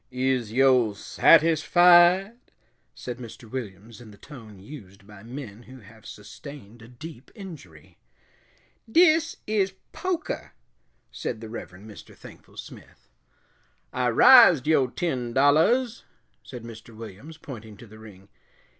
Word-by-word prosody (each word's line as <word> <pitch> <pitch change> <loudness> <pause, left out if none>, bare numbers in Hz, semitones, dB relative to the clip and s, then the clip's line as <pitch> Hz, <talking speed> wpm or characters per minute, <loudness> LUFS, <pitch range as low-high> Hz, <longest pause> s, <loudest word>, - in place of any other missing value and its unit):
"Is 125 -3 -2
yo' 125 -3 +3
satisfied?" 175 - +4 0.6
said 125 0 -8
Mr. 120 0 -11
Williams, 110 -1 -9
in 115 - -13
the 105 - -16
tone 115 -8 -13
used 100 -4 -13
by 105 -1 -15
men 115 -2 -10
who 130 +1 -15
have 110 +1 -17
sustained 115 +1 -12
a 110 - -14
deep 130 +2 -12
injury. 155 - -13 0.9
"Dis 325 +1 +3
is 200 -3 -1 0.2
pokah," 370 -3 -5 0.6
said 115 - -6
the 110 -1 -10
Reverend 100 -3 -10
Mr. 105 - -14
Thankful - - -16
Smith. - - -13 0.8
"I 125 -1 0
rised 175 - +7
yo' 150 -4 +2
ten 125 -5 -4
dollahs," 190 - +2 0.4
said 125 -3 -11
Mr. 115 0 -12
Williams, 115 +8 -11
pointing 110 -9 -11
to 120 - -13
the 110 0 -16
ring. 100 -3 -15
125 Hz, 125 wpm, -24 LUFS, 110-160 Hz, 0.9 s, rised